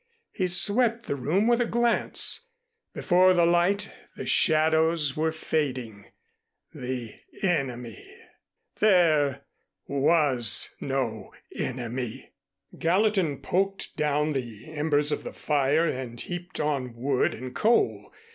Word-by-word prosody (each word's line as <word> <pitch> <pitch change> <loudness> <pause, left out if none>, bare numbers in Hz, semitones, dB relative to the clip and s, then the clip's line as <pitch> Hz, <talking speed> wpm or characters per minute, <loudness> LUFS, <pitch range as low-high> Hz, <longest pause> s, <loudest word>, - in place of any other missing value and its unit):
He 185 - -1
swept 225 +6 +2
the - - -2
room 155 - 0
with 240 +1 +3
a 240 - +1
glance. 235 - +1 0.4
Before 185 0 +3
the 170 -1 +4
light 175 +4 +2 0.2
the - - -6
shadows 160 -2 +3
were 160 +1 0
fading. 130 -10 -3 0.7
The 125 -3 -6 0.2
Enemy 125 - -2 0.8
There 155 -9 +3 0.4
was 140 -6 +2
no 120 -7 -3 0.2
Enemy! 125 -2 -5 0.5
Gallatin 185 -4 +1
poked 195 +1 -1
down 150 0 0
the 120 +1 -6
embers 150 -1 +1
of - - -2
the - - -7
fire 150 +2 +1
and 125 -5 -5
heaped 175 +4 -6
on 135 -5 -2
wood 130 +2 0
and 125 +2 -8
coal. 230 - +1
150 Hz, 110 wpm, -26 LUFS, 130-180 Hz, 0.8 s, the